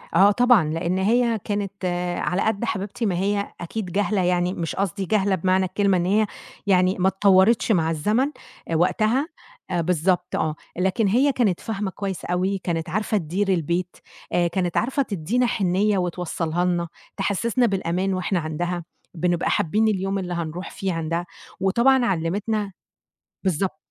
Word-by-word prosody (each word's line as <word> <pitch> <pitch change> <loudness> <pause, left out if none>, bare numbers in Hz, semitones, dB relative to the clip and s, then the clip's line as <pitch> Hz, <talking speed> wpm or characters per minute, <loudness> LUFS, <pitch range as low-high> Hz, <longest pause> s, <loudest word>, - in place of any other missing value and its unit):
آه 200 +2 +7
طبعًا، 245 -3 +5
لإن 170 +3 -1
هي 230 +3 +2
كانت 200 -2 -3 0.3
على 180 - 0
قد 220 +1 0
حبيبتي 210 +1 -3
ما 190 -4 +1
هي 200 +3 -1
أكيد 200 +5 -4
جاهلة، 205 +1 +1
يعني 180 0 +1
مش 165 -4 -4
قصدي 195 0 -2
جاهلة 200 -1 +2
بمعنى 185 +1 +2
الكلمة 195 +1 +1
إن 175 - 0
هي 210 +3 +2 0.4
يعني 185 -1 +4
ما 185 - +3
اتطوَّرتش 195 +4 +4
مع 165 -5 +2
الزمن 210 - +1 0.4
آآ 165 - 0
وقتها، 215 - +2 0.4
آآ 175 -2 +1
بالضبط 180 +2 0
آه. 155 -1 0 0.2
لكن 190 +4 +1
هي 255 +8 +3
كانت 220 -9 +1
فاهمة 205 -3 -3
كويس 195 -1 -5
أوي، 185 +3 0
كانت 170 -2 -3
عارفة 215 +4 0
تدير 190 +3 -1
البيت، 175 0 -1 0.4
آآ 175 -1 +3
كانِت 175 0 -1
عارفة 265 +5 +1
تدّينا 210 +4 0
حِنّية 200 -1 +1
وتوصّلها 175 -1 -1
لنا، 175 -1 0 0.3
تحسِّسنا 215 +5 +1
بالأمان 190 -2 0
وإحنا 185 0 0
عندها، 170 +2 -3 0.3
بنبقى 175 0 0
حابّين 215 +7 +2
اليوم 195 -1 0
اللي 180 -2 -4
هنروح 170 +2 -4
فيه 190 -2 -3
عندها. 165 +1 -2 0.3
وطبعًا 240 +7 +3
علِّمتنا 200 +3 -1 0.7
بالضبط. 185 -1 0
190 Hz, 155 wpm, -23 LUFS, 175-210 Hz, 0.7 s, آه